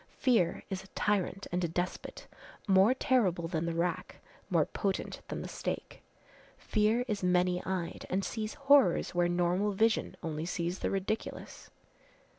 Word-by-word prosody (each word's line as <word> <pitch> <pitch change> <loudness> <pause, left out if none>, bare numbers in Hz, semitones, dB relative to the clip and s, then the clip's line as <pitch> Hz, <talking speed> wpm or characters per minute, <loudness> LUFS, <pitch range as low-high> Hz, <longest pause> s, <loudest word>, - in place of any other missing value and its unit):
Fear 230 -10 +2
is 190 0 -3
a - - -15
tyrant 200 -1 0
and 180 +1 0
a - - +2
despot, 175 +2 -4 0.4
more 195 +5 +5
terrible 190 -11 +1
than 165 -1 -2
the 170 - -1
rack, 170 0 -2 0.3
more - - +3
potent 195 -2 -3
than - - -4
the - - -5
stake. - - -5 0.6
Fear 220 +3 +1
is 210 -3 -2
many 180 0 +2
eyed 185 -3 -3
and 190 +2 0
sees 215 -2 -4
horrors 275 - +4
where 175 0 +2
normal 180 +4 +1
vision 220 +3 +1
only 160 0 -3
sees 175 +1 -2
the - - -1
ridiculous." 195 +3 -4
185 Hz, 150 wpm, -31 LUFS, 175-210 Hz, 0.6 s, more